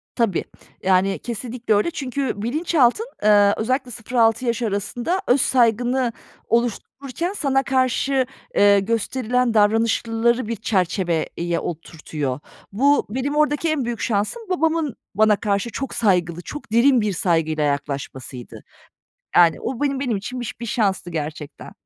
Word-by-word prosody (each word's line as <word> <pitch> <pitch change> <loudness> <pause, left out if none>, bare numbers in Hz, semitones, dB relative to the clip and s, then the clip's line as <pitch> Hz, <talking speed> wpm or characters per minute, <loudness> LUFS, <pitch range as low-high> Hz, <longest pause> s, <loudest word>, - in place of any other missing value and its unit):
Tabii. 225 -7 +1 0.4
Yani, 190 +1 +2
kesinlikle 240 0 -3
öyle. 210 +11 +2
Çünkü 265 -7 -3
bilinçaltın, 295 - +2 0.2
eee, 205 -1 +5
özellikle 255 +3 -1
0-6 230 +1 +1
yaş 235 0 -1
arasında 235 - -1
öz 250 +2 +4
saygını 245 +1 +2 0.4
oluştururken 255 - -2
sana 275 -8 +1
karşı, 260 0 +1 0.3
eee, 200 0 +6
gösterilen 230 +3 0
davranışları 225 +2 +2
bir 230 - -2
çerçeveye 175 -4 -1
oturtuyor. 155 -5 -5 0.3
Bu, 280 +8 +3
benim 265 +6 -2
oradaki 300 +1 +1
en 300 -5 0
büyük 235 -2 -3
şansım 215 - -1
babamın 325 -6 0 0.2
bana 215 +1 +4
karşı 205 +2 -1
çok 270 +2 -4
saygılı, 180 -6 +1
çok 295 +2 -9
derin 240 +2 +4
bir 210 -2 0
saygıyla 165 -3 0
yaklaşmasıydı. 140 -3 -4 0.7
Yani, 170 -2 +5
o 255 - -4
benim 275 -2 0
benim 250 -6 0
için 245 +6 -5
bi - - -4 0.2
bir 235 - -4
şanstı 195 -6 0
gerçekten. 155 -2 -6
230 Hz, 130 wpm, -22 LUFS, 195-260 Hz, 0.7 s, eee